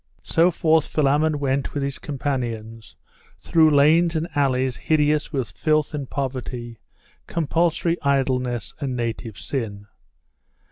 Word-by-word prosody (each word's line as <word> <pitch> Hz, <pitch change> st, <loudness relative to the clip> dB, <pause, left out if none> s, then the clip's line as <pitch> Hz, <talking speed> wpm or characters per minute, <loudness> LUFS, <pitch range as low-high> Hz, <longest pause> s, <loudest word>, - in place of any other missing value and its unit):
So 165 Hz, +2 st, +3 dB
forth 160 Hz, -2 st, +2 dB
Philammon 150 Hz, +1 st, +2 dB
went 140 Hz, -1 st, -1 dB
with 145 Hz, -, -1 dB
his 140 Hz, -1 st, -3 dB
companions, 115 Hz, -7 st, -4 dB, 0.4 s
through 160 Hz, -1 st, +4 dB
lanes 160 Hz, +4 st, +4 dB
and 160 Hz, +1 st, -1 dB
alleys 130 Hz, -2 st, +1 dB
hideous 150 Hz, -1 st, +1 dB
with 135 Hz, -6 st, -2 dB
filth 155 Hz, -1 st, 0 dB
and 145 Hz, -3 st, -4 dB
poverty, 125 Hz, -4 st, -4 dB, 0.5 s
compulsory 170 Hz, +1 st, 0 dB
idleness 130 Hz, -4 st, 0 dB
and 135 Hz, -3 st, -3 dB
native 115 Hz, -3 st, -4 dB
sin. 105 Hz, -7 st, -4 dB
140 Hz, 120 wpm, -23 LUFS, 125-155 Hz, 0.5 s, through